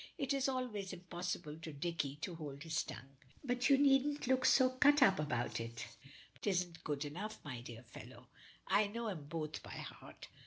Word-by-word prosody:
It 275 0 0
is 275 -1 +2
always 225 -7 -2
impossible 175 -3 -4
to 160 0 -7
Dicky 145 -1 -2
to 180 - -3
hold 145 -3 -7
his 160 -2 0
tongue. 135 +1 -9 0.3
"But 245 -1 +1
you 275 - +7
needn't 285 +1 +4
look 260 0 +3
so 260 -1 +6
cut 290 +2 +6
up 195 -9 +5
about 145 -5 -1
it. 115 0 -5 0.6
'Tisn't 180 -4 0
good 145 -1 -2
enough, 190 +9 -5
my 130 -4 -5
dear 120 -1 -9
fellow. 115 - -11 0.4
I 210 0 +4
know 230 +2 -3
'em 160 -8 -5
both 155 0 -4
by - - -8
heart. - - -9
180 Hz, 180 wpm, -37 LUFS, -, 0.6 s, you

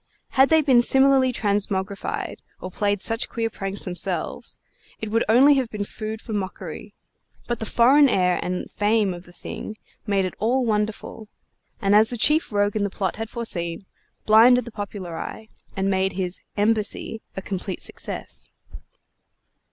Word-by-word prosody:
Had 265 +1 +4
they 320 -1 +5
been 260 -4 +5
similarly 265 0 +4
transmogrified, 200 -3 -2 0.2
or 185 - -7
played 205 +1 0
such 225 0 -1
queer 225 -1 -2
pranks 195 0 -3
themselves, 180 -1 -3 0.4
it 215 -1 -5
would 230 +1 +2
only 265 +6 +7
have 255 -4 0
been 210 -2 -4
food 215 +2 -6
for 220 - -7
mockery; 195 0 -5 0.5
but 240 -2 -2
the 220 - -4
foreign 270 +6 +5
air 180 -4 +2
and 180 0 -3
fame 210 -2 +1
of 175 +1 -10
the 175 - -16
thing 215 +4 -8 0.3
made 195 -2 +1
it 185 - -4
all 245 +4 +1
wonderful, 215 0 -2 0.5
and, 195 0 +2
as 215 +1 +6
the 245 - -4
chief 300 +6 +3
rogue 205 0 +1
in 210 - 0
the 200 - 0
plot 190 -1 -3
had 225 0 -5
foreseen, 180 -7 -3 0.4
blinded 235 +3 +6
the 235 - -8
popular 200 -5 -6
eye 220 0 -7 0.3
and 195 0 0
made 190 0 +1
his 180 -1 -3 0.2
"embassy" 220 +1 0 0.2
a - - -2
complete 190 -1 -4
success. - - -6
210 Hz, 160 wpm, -23 LUFS, 195-230 Hz, 0.5 s, only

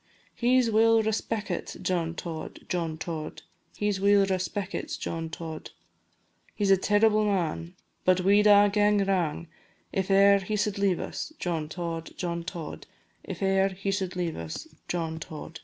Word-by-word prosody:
He 250 +2 +3
's 235 -3 +1
weel 225 +1 +5
respeckit, 220 0 -2
John 170 -2 -1
Tod, 165 -2 -6
John 165 -3 -2
Tod, 160 -2 -6 0.3
He 210 - 0
's 200 -2 0
weel 200 0 +5
respeckit, 190 +1 -3
John 165 -1 -4
Tod; 160 -1 -7 0.9
He 205 - 0
's 195 - +4
a 195 - +7
terrible 210 +2 +3
man, 175 -3 -1 0.3
But 185 0 +3
we 200 +3 +5
'd 210 - +3
a' 205 0 +7
gae 205 -1 +3
wrang 170 -4 0 0.5
If 190 0 -1
e'er 200 +1 +6
he 195 +2 -3
sud 210 0 -1
leave 195 -3 +2
us, 310 - -5
John 165 - -2
Tod, 165 -1 -5
John 170 -1 -3
Tod, 165 -3 -7 0.4
If - - -6
e'er 195 0 +3
he 195 +1 -3
sud 190 -2 -2
leave 175 -3 -2
us, 80 -1 -6 0.2
John 160 -2 -2
Tod. 160 +1 -8
190 Hz, 165 wpm, -27 LUFS, 170-205 Hz, 0.9 s, a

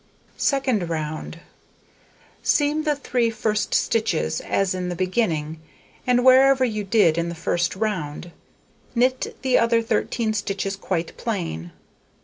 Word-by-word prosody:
Second 260 - +1
round: 155 +1 -4 1.0
Seam 300 +1 +1
the 300 -1 +2
3 250 -4 0
first 215 -1 -1
stitches, 215 - 0
as 195 -2 0
at 180 -1 -3
the 175 - -3
beginning, 165 -5 -1 0.5
and 245 0 +3
wherever 260 0 +6
you 215 -3 -2
did 190 -5 +3
in 170 0 -1
the 170 - -5
first 170 +2 -1
round; 175 -6 -3 0.6
knit 255 +2 +1
the 260 -1 +3
other 230 0 +3
13 225 0 -1
stitches 195 -1 -2
quite 180 -4 -3
plain. 170 - -4
210 Hz, 130 wpm, -23 LUFS, 170-245 Hz, 1.0 s, wherever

